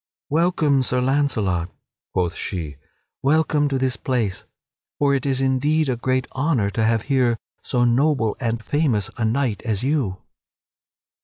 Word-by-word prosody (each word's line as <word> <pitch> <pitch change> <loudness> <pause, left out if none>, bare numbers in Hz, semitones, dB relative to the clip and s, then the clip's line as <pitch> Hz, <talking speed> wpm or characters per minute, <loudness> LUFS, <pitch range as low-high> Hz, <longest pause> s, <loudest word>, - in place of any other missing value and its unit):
"Welcome, 155 -4 +2
Sir 125 0 0
Launcelot!" 115 -10 0 0.4
quoth 90 -2 0
she; 80 -7 -5 0.4
"welcome 150 +1 +2
to 135 - 0
this 130 -3 0
place! 115 -6 -2 0.5
For 140 -1 +2
it 135 0 0
is 135 -1 0
indeed 140 +3 +2
a 125 - +1
great 130 +2 0
honor 130 -8 0
to 110 - -1
have 110 0 +2
here 130 -4 +2 0.2
so 120 -2 +1
noble 120 -2 +2
and 115 -2 -2
famous 130 - 0
a 115 - 0
knight 115 -3 0
as 110 -4 -2
you!" 130 -10 0
130 Hz, 145 wpm, -22 LUFS, 110-140 Hz, 0.5 s, Welcome